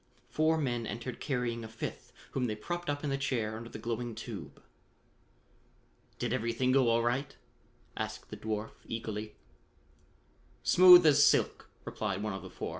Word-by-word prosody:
Four 160 +1 +2
men 120 -6 -1
entered 115 +3 -5
carrying 120 -4 -2
a - - -6
fifth 110 0 -7 0.2
whom 125 -2 -1
they 105 - -2
propped 175 +10 -4
up 145 0 -2
in 145 - -1
the 135 - -1
chair 115 -5 -1
under 115 +1 -8
the - - -8
glowing 115 0 -4
tube. 115 - -8 1.6
"Did - - -2
everything 115 +3 0
go 130 -2 +4
all 115 0 +3
right?" 130 +3 -1 0.6
asked - - -5
the - - -6
dwarf 110 0 -3 0.2
eagerly. 110 -2 -5 1.3
"Smooth 180 -1 +9
as 145 -2 +6
silk," - - +2 0.2
replied 100 -2 -3
one 110 -2 -2
of 95 - -5
the - - -9
four. - - -5
120 Hz, 160 wpm, -31 LUFS, 110-140 Hz, 1.6 s, Smooth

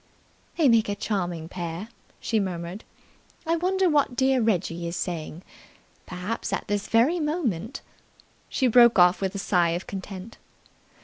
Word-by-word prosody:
"They 320 -4 +4
make 230 -4 +4
a 200 - -1
charming 180 -6 -3
pair," 175 +3 -6 0.3
she 225 - 0
murmured. 180 0 -4 0.6
"I 330 +1 +1
wonder 375 +2 +1
what 290 -6 +2
dear 265 0 +2
Reggie 175 -6 0
is 170 - -4
saying. 170 -1 -4 0.6
Perhaps 185 +4 -4
at 195 - -3
this 205 -1 -2
very 255 +10 +3
moment 275 - -2 0.3
" - - -36 0.3
She 265 - 0
broke 240 -1 +6
off 180 +1 +5
with 190 0 -2
a - - -2
sigh 180 -3 +2
of 175 - -5
content. 195 +2 -8
205 Hz, 150 wpm, -25 LUFS, 180-245 Hz, 0.6 s, broke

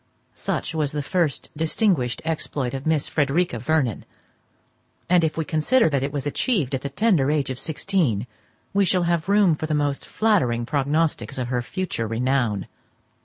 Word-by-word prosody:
Such - - -3
was 150 -3 -1
the 145 -1 -2
first 165 -4 -1
distinguished 160 - +1
exploit 145 -5 -2
of 135 +2 -4
Miss 155 -3 +2
Frederica 145 -2 0
Vernon; 130 -4 0 1.0
and, 180 -1 +4
if 160 0 0
we 160 - -1
consider 160 +9 +3
that 140 -3 0
it 140 +1 -2
was 145 -1 -3
achieved 145 - 0
at 130 - -1
the 140 - -4
tender 160 -4 +2
age 145 -3 0
of 130 - -5
sixteen, 155 - 0 0.5
we 200 0 +4
shall 185 -1 +2
have 170 +1 0
room 200 -4 +5
for 155 +1 -3
the 155 - 0
most 145 -1 0
flattering 125 - +1
prognostics 145 +1 0
of 125 -2 -2
her 125 -1 0
future 155 - -3
renown. 115 -3 0
150 Hz, 170 wpm, -23 LUFS, 130-170 Hz, 1.0 s, room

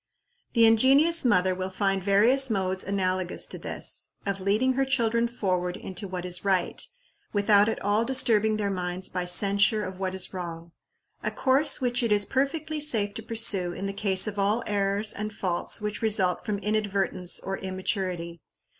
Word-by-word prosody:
The 230 -2 +5
ingenious 270 +9 +4
mother 185 -7 +2
will 185 +1 -4
find 195 0 -1
various 230 +8 +4
modes 190 -3 -1
analogous 185 -2 -2
to - - -9
this, - - -2 0.2
of 200 -1 -3
leading 215 +7 +1
her 270 +1 +1
children 235 -3 +1
forward 185 -6 -2
into 190 +1 -6
what 180 -1 -6
is 180 -1 -3
right, 190 -3 0 0.5
without 205 0 +4
at - - -3
all 205 +3 +1
disturbing 225 -4 +2
their 205 -2 -1
minds 180 0 -4
by 180 -1 -3
censure 200 +3 +2
of 185 -1 -7
what 190 -1 -3
is 190 0 -2
wrong 170 -2 -7 0.5
a - - -1
course 270 +3 +2
which 245 0 0
it 230 -2 -1
is 205 -1 +3
perfectly 300 +6 -2
safe 220 -9 +3
to 225 - -6
pursue 215 -6 +2
in 195 - -6
the 195 - -3
case 195 -2 +3
of 205 -1 -4
all 210 +4 +1
errors 200 +1 0
and 215 +1 -5
faults 180 0 -2
which 210 0 -4
result 200 -5 0
from 210 -1 -1
inadvertence 200 -3 -1
or 195 0 -5
immaturity. 185 -3 -4
200 Hz, 170 wpm, -26 LUFS, 185-225 Hz, 0.5 s, The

